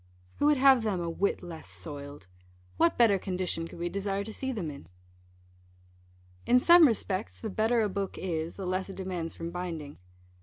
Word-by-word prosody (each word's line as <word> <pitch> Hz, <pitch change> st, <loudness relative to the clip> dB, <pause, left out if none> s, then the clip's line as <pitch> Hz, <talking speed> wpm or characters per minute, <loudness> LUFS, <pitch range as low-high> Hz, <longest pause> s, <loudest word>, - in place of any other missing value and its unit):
Who 290 Hz, -, +2 dB
would 300 Hz, -1 st, +4 dB
have 265 Hz, -1 st, +6 dB
them 210 Hz, -5 st, -1 dB
a 170 Hz, -1 st, -2 dB
whit 195 Hz, +3 st, -1 dB
less 170 Hz, -2 st, -8 dB
soiled? 145 Hz, -, -7 dB, 0.5 s
What 170 Hz, -, +3 dB
better 220 Hz, -5 st, +5 dB
condition 180 Hz, -3 st, -3 dB
could -, -, -12 dB
we 170 Hz, +1 st, -2 dB
desire 200 Hz, +2 st, -2 dB
to 220 Hz, +1 st, -7 dB
see 265 Hz, +3 st, -3 dB
them 185 Hz, -11 st, -3 dB
in? 140 Hz, -, -11 dB, 1.6 s
In 245 Hz, -, +6 dB
some 340 Hz, +4 st, +8 dB
respects 210 Hz, -3 st, -2 dB
the 220 Hz, -, -5 dB
better 225 Hz, +3 st, +2 dB
a -, -, +2 dB
book 195 Hz, -1 st, -4 dB
is, 165 Hz, -2 st, -3 dB
the 195 Hz, -, -6 dB
less 185 Hz, +1 st, -2 dB
it 195 Hz, -, -7 dB
demands 180 Hz, -3 st, -4 dB
from 165 Hz, 0 st, -5 dB
binding. 165 Hz, -5 st, -6 dB
190 Hz, 185 wpm, -29 LUFS, 170-220 Hz, 1.6 s, some